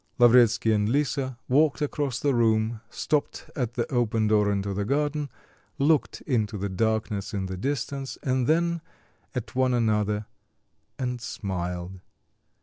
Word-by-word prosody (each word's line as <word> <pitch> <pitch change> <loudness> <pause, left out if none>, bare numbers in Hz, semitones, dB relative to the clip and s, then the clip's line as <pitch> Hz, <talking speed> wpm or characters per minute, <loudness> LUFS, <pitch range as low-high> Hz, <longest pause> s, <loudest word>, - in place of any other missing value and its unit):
Lavretsky 120 -2 +5
and 105 0 +1
Lisa 135 -1 0
walked 145 +3 +3
across 145 -3 -1
the 145 -1 +1
room, 110 -1 +2
stopped 150 +3 -2
at 120 -3 -2
the - - 0
open 115 -2 +1
door 105 -1 +3
into 100 0 -1
the 100 +1 -1
garden, 145 +4 0 0.5
looked 150 +2 +2
into 110 -6 -1
the 100 +1 -3
darkness 110 +1 -1
in 95 -1 -1
the 95 0 -4
distance 135 +4 -3
and 130 -2 +1
then 170 +1 +2 0.5
at 110 -3 -4
one 130 -1 +2
another, 105 -2 +1 0.7
and 125 -2 -3
smiled. 90 -4 -4
120 Hz, 140 wpm, -26 LUFS, 105-135 Hz, 0.7 s, Lavretsky